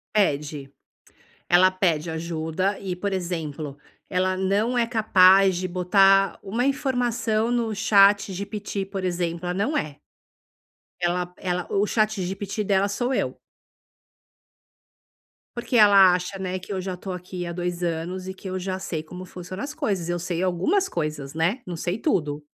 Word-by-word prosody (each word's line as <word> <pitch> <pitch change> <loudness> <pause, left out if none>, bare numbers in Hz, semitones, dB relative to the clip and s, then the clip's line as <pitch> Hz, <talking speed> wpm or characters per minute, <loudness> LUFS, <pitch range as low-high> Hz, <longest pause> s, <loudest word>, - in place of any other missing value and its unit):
Pede. 145 -7 0 0.8
Ela 185 +2 +6
pede 170 -4 0
ajuda 165 +4 -2
e, 185 -2 -4
por 200 +3 -3
exemplo, 160 -6 -4 0.3
ela 185 0 0
não 205 +6 +1
é 235 - +3
capaz 195 -4 +5
de 185 +1 -2
botar 195 +2 +4
uma 225 +5 -1
informação 245 -5 0
no 235 -2 0
ChatGPT, 200 -1 +2
por 195 0 -5
exemplo, 175 -1 -2
ela 180 - -1
não 205 +11 -1
é. 150 - -2 1.0
Ela, 175 0 -1
ela 180 -1 -2
o 200 +1 +2
ChatGPT 205 -1 -1
dela 195 0 +2
sou 245 +6 -1
eu. - - -1 2.2
Porque 240 +1 0
ela 200 -4 +7
acha, 180 +2 -5
né, 185 -1 -3
que 190 +2 -7
eu 190 - -2
já 185 -1 -4
estou 185 +1 -6
aqui 180 0 -6
há 170 - -5
2 175 0 -3
anos 175 +2 -3
e 190 - -4
que 190 0 -9
eu 185 - -3
já 185 0 -3
sei 160 -4 -4
como 180 +3 -9
funcionam 185 +1 -8
as 290 +2 -5
coisas. 200 - -2
Eu 175 - 0
sei 175 0 -3
algumas 190 - +1
coisas, 150 -3 -4
né. 170 +10 +1
Não 175 - -4
sei 180 +6 -2
tudo, 150 - -1
185 Hz, 155 wpm, -24 LUFS, 175-200 Hz, 2.2 s, ela